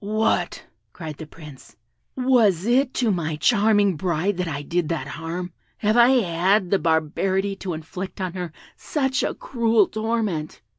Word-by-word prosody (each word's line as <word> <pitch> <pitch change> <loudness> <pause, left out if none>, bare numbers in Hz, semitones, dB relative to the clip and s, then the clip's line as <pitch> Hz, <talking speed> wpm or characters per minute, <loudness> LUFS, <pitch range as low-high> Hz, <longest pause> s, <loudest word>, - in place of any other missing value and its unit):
"What!" 215 +2 0 0.3
cried 155 -4 -7
the 160 - -8
Prince, 150 -4 -13 0.4
"was 230 -9 +3
it 255 +3 +3
to 235 -4 +2
my 160 -4 -1
charming 205 +1 +3
bride 175 +3 -1
that 180 -1 -1
I 145 -2 -4
did 170 +2 -1
that 165 -6 -2
harm? 170 +3 -5 0.2
Have 215 +1 +1
I 240 0 +7
had 190 -5 +2
the 195 - +3
barbarity 180 +5 0
to 185 -3 -4
inflict 180 +5 -7
on 185 -2 -3
her 180 -3 -5 0.2
such 265 -3 -1
a - - -1
cruel 230 -4 +2
torment! 215 - -3
190 Hz, 155 wpm, -23 LUFS, 165-220 Hz, 0.4 s, I